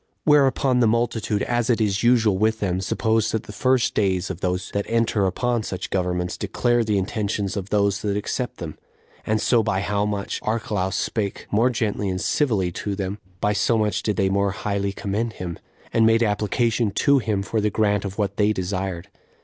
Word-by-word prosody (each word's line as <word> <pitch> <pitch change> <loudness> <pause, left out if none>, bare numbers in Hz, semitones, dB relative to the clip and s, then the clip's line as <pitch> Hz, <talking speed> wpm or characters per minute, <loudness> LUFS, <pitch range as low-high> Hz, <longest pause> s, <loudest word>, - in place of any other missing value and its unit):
Whereupon 135 -3 +3
the 120 - +4
multitude, 115 -2 0
as 120 -1 0
it 120 - +3
is 100 -2 +1
usual 115 -4 +4
with 110 +3 +1
them, 95 -2 -1
supposed 110 +3 0
that 110 - -1
the - - -10
first 130 -2 +1
days 95 -2 0
of 90 - -8
those 90 0 -2
that 100 0 -1
enter 115 -3 +2
upon 120 +5 0
such 95 -4 -5
governments 90 -1 -1
declare 120 +4 +1
the 105 -2 0
intentions 100 0 -2
of 100 -1 -4
those 100 -1 +1
that 100 -1 -1
accept 120 +3 -3
them; 80 -3 -7 0.5
and 110 0 +2
so 120 +2 +3
by 95 -3 0
how 105 0 0
much 100 -1 -3
Archelaus 105 -3 -1
spake 100 -3 -2
the - - 0
more 115 +4 +4
gently 105 -4 -1
and 95 0 -2
civilly 105 -8 +1
to 100 +3 -4
them, 100 +1 -4 0.2
by 105 - +2
so 115 +2 +2
much 105 -1 0
did 105 - -1
they 95 +1 +2
more 100 +1 +1
highly 100 0 -2
commend 105 +3 -2
him, 90 -4 -6 0.3
and 115 - +4
made 115 +1 +4
application 110 +2 +1
to 140 +8 +3
him 105 -5 -1
for 110 +2 -1
the 105 - +2
grant 105 -1 +1
of 100 -1 -5
what 100 -2 -1
they 105 0 +3
desired. 95 -2 -3
105 Hz, 200 wpm, -23 LUFS, 95-115 Hz, 0.5 s, the